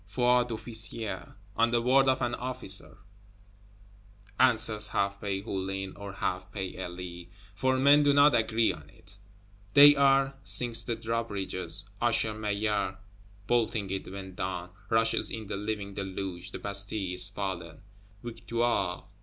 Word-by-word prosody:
"Foi 125 +4 +3
d'officier, 110 -3 -1 0.2
On 115 +1 +3
the 120 0 +2
word 130 +3 +4
of 130 -1 +2
an 120 - -1
officer," 125 -6 -4 1.4
answers 110 -4 +4
half 100 -1 -1
pay 100 -1 -2
Hulin, 95 -1 -4
or 100 -1 -8
half 95 0 -3
pay 95 -3 -5
Elie 90 -1 -7 0.2
for 130 +5 +1
men 140 +3 +6
do 145 -1 +4
not 145 +1 +6
agree 115 -1 +2
on 75 -1 -13
it 100 +6 -20 0.6
"they 145 +1 +10
are!" 135 -1 +3
Sinks 115 -2 -1
the 120 - -2
drawbridge, 115 -3 -3 0.5
Usher 115 -2 +1
Maillard 105 -2 -1 0.5
bolting 110 -4 0
it 95 -1 -4
when 95 -1 -8
down; 90 -1 -4 0.2
rushes 115 0 +1
in 110 -1 -6
the 100 - -5
living 100 -1 -4
deluge; 95 -2 -5
the - - -7
Bastille 100 -1 -1
is 90 +1 +5
fallen! 95 -5 -5 0.4
_Victoire! 115 0 -2
105 Hz, 135 wpm, -29 LUFS, 95-120 Hz, 1.4 s, they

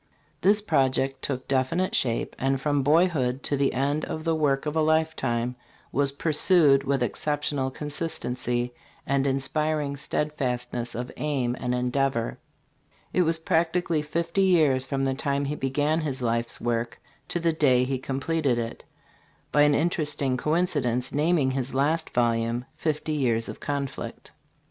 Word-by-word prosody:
This 205 +2 +4
project 135 -5 +1
took 130 -2 -3
definite 140 +8 0
shape, 115 -3 +1
and 135 0 +1
from 145 0 +1
boyhood 145 -4 +2
to 145 - 0
the 140 0 +1
end 140 +4 0
the 160 +1 -1
work 145 -3 +1
of 150 +1 -2
a 160 - +3
lifetime 135 -7 0 0.4
was 140 +1 +2
pursued 150 -1 +4
with 135 -2 0
exceptional 145 +2 -1
consistency 125 -5 -2 0.3
and 140 0 +1
inspiring 145 +2 0
steadfastness 125 -4 -2
of 125 +2 -4
aim 135 -5 -1
and 125 -1 -1
endeavor. 125 -1 -1 0.7
It 185 - +3
was 165 -1 +2
practically 165 0 +1
fifty 170 +5 -1
years 155 -9 +3
from 135 -1 -1
the 135 - +1
time 140 +1 -1
he 145 +2 -2
began 145 +4 0
his 140 -4 -3
life's 115 0 0
work 115 -1 -2 0.3
to 175 - 0
the 165 -1 +1
day 130 -5 +3
he 130 0 -1
completed 135 0 -1
it 115 0 -4 0.7
by 145 - +4
an 145 -1 +5
interesting 150 -5 +1
coincidence 145 -5 0
naming 150 -2 +2
his 130 0 -3
last 155 +4 +1
volume, 120 0 0
"Fifty 155 0 -2
Years 120 -6 +1
of - - -7
Conflict." 140 -2 -5
140 Hz, 145 wpm, -26 LUFS, 130-155 Hz, 0.7 s, an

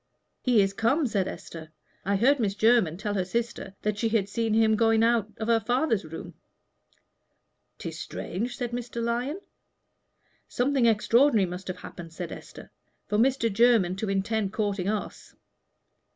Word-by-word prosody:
"He 240 -5 +4
is 195 0 -1
come," 245 +9 +1
said 200 -6 0
Esther. 160 -1 -8 0.4
"I 200 +1 +1
heard 260 +8 +3
Miss 200 -4 0
Jermyn 220 -7 +3
tell 205 +1 -3
her 190 -2 0
sister 230 0 -3
that 210 -1 -1
she 225 - +1
had 215 -3 +1
seen 225 +1 -1
him 220 -1 +4
going 225 0 +3
out 230 -2 +2
of 220 - -4
her 230 -1 +4
father's 240 - 0
room." 160 +1 -8 1.4
"'Tis - - -6
strange," 235 +7 -4
said 240 -1 -3
Mr. 240 0 -5
Lyon. 240 +8 -1 1.1
"Something 255 -1 +1
extraordinary 230 +1 +4
must 180 +1 -7
have 185 - -4
happened," 165 -2 -10
said 175 -1 -6
Esther, - - -11 0.3
"for 210 0 0
Mr. 235 -3 +2
Jermyn 225 -5 +4
to 210 0 -3
intend 195 +1 0
courting 205 -3 -1
us. 215 -1 -5
220 Hz, 155 wpm, -27 LUFS, 195-235 Hz, 1.4 s, He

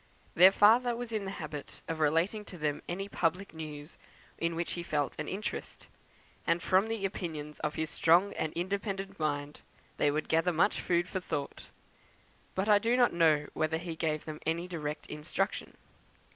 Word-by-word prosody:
Their 185 +3 +8
father 235 +4 +5
was 240 -1 -5
in 215 -3 -2
the - - -3
habit 150 -3 -7
of 165 -1 -3
relating 165 +8 +2
to 180 - -10
them 150 -2 -1
any 195 +3 -3
public 180 +1 -1
news 155 -1 -8 0.4
in 170 0 0
which 170 +1 -2
he 175 - -3
felt 150 -4 -1
an 155 - -3
interest; 205 +3 -5 0.6
and 170 +1 +3
from 190 +3 +3
the 225 -3 -2
opinions 155 -6 -5
of 150 -1 -2
his 160 0 -2
strong 175 +5 +4
and 155 - -2
independent 195 +2 -3
mind 145 -1 -2 0.4
they 145 - +3
would 150 +2 -1
gather 165 +3 +3
much 175 +5 +2
food 175 0 +1
for 185 - -3
thought; 155 -6 -4 0.9
but 190 +2 0
I 210 -1 +6
do 230 +3 +2
not 245 -1 +4
know 155 -3 +4
whether 155 +1 0
he 170 0 -5
gave 155 -2 -1
them 155 -1 -6
any 170 +2 -1
direct 155 -4 -4
instruction. 155 +6 -3
170 Hz, 175 wpm, -31 LUFS, 155-195 Hz, 0.9 s, Their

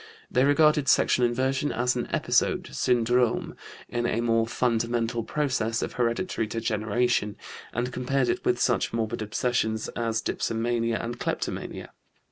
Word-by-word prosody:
They 130 +2 +3
regarded 150 0 +4
sexual 125 -1 +4
inversion 130 +4 0
as 125 +2 0
an 120 - -3
episode - - +1
(syndrome) 120 0 +1 0.3
in 120 0 -1
a 115 - 0
more 115 -1 +2
fundamental 115 -1 0
process 120 -6 -1
of - - -4
hereditary 115 +1 -1
degeneration, 110 0 0 0.4
and 120 +2 -2
compared 125 +1 0
it - - -1
with - - +1
such - - +1
morbid 110 -2 -2
obsessions 110 0 -1
as 115 -1 -1
dipsomania 115 0 -1
and 120 +1 -5
kleptomania. - - -4
120 Hz, 130 wpm, -26 LUFS, 115-125 Hz, 0.4 s, regarded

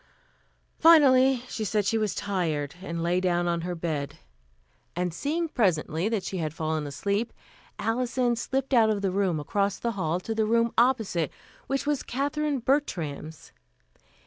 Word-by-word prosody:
Finally 270 -6 +6
she 220 - -4
said 210 0 0
she 225 - +1
was 215 -3 0
tired 160 -8 -2
and 170 -3 -4
lay 175 +2 +1
down 175 -1 +1
on 170 -1 0
her 175 +1 -3
bed; 155 -4 -3 0.8
and 180 -1 -1
seeing 315 - -1
presently 180 - 0
that 220 -4 -1
she 190 - -4
had 155 -2 -3
fallen 155 -2 -2
asleep, 200 +10 -2 0.5
Alison 245 +1 0
slipped 270 +3 -2
out 225 -3 +5
of 205 -2 -1
the 195 - +1
room 185 -4 0
across 200 +6 -1
the 235 - -2
hall 180 -5 -1
to 225 +4 -4
the 220 -1 0
room 230 +1 +2
opposite, 225 - +2 0.4
which 275 +1 -1
was 295 -2 0
Katherine 285 +2 -1
Bertram's. 160 - -2
200 Hz, 155 wpm, -27 LUFS, 170-245 Hz, 0.8 s, Finally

